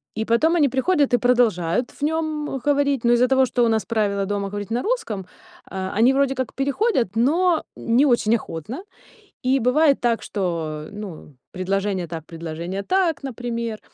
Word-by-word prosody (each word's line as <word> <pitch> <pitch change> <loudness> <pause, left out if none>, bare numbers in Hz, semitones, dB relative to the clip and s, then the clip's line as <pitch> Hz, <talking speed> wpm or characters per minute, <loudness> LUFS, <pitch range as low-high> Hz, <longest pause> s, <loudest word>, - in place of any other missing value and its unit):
И 220 +1 -2
потом 310 +10 +3
они 295 -4 +4
приходят 280 0 +1
и - - +6
продолжают 240 -5 +1
в - - -20
нём 310 -3 -1
говорить, 285 -3 +2
но 240 - +5
из-за 245 +1 +4
того, 265 0 +4
что 245 -1 0
у - - +4
нас 220 -1 +1
правила 205 -3 0
дома 200 0 -2
говорить 205 +1 -6
на 240 - 0
русском, 245 - -2 0.5
э, 190 0 -3
они 250 +4 +5
вроде 270 0 +1
как 260 -2 -3
переходят, 275 - 0
но 320 +8 +2
не 245 +5 +2
очень 235 -3 +3
охотно. 215 - -6 0.6
И 260 +2 +2
бывает 275 +4 +3
так, 230 -3 +1
что, 165 -6 -3
ну, 190 -9 -9 0.2
предложение 190 0 -2
так, 160 -1 -7
предложение 170 +3 -5
так, 365 - +1
например. 235 -3 -4
235 Hz, 170 wpm, -22 LUFS, 200-275 Hz, 0.6 s, и